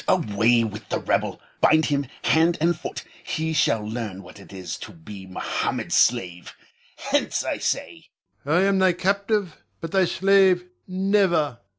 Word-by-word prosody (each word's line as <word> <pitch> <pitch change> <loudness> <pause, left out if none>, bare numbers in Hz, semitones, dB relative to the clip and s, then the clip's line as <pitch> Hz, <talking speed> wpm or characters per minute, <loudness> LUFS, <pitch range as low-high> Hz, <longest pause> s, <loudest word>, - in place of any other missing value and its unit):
Away 115 - +3
with 105 -1 -6
the - - 0
rebel! - - -1 0.2
Bind 155 0 +4
him 140 -2 -1 0.2
hand 165 +2 +3
and 170 +2 +2
foot. - - -7 0.2
He 160 0 -2
shall 110 -8 +1
learn 110 -4 -5
what 90 - -14
it 100 - -15
is 95 -2 -6
to - - -9
be 95 +4 -11
Mohammed's 95 - -3
slave. 90 -8 +1 0.4
Hence, - - -1
I - - -2
say! - - -3 0.3
Ion. 145 - -4
I 180 - +4
am 195 -1 +2
thy 185 -1 +4
captive, 200 0 -1 0.2
but 165 - -6
thy 190 -1 +3
slave 190 0 +3 0.2
never! 185 - +1
155 Hz, 160 wpm, -24 LUFS, -, 0.4 s, Bind